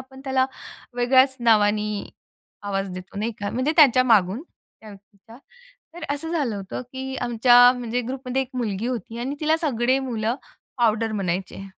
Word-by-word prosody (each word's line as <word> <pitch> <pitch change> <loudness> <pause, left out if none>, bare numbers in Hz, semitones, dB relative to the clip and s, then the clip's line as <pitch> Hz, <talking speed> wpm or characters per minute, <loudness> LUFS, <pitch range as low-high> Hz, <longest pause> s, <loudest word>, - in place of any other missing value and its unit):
आपण 265 0 -13
त्याला 265 -1 +1 0.5
वेगळ्याच 260 +2 +3
नावाने 210 -2 +3 0.7
आवाज 195 -1 -3
देतो 185 +2 -9
नाही 225 +2 -2
का, 205 -1 -3
म्हणजे 255 +6 0
त्याच्यामागून 245 - +4
त्या 220 -9 -20
व्यक्तीच्या. 205 +2 -16 0.6
तर 345 -2 -8
असं 320 +3 -6
झालं 265 -11 -1
होतं, 195 +5 -6
की 265 0 -5
आमच्या 245 +1 +6
म्हणजे 240 0 -2
ग्रुपमध्ये 265 0 -2
एक 255 - -9
मुलगी 225 -3 -2
होती 235 -2 -5
आणि 265 +4 -3
तिला 310 +1 +2
सगळे 260 -5 +1
मुलं 235 -3 -2 0.4
पावडर 225 -1 +1
म्हणायचे. 195 0 -3
240 Hz, 145 wpm, -23 LUFS, 210-265 Hz, 0.7 s, आमच्या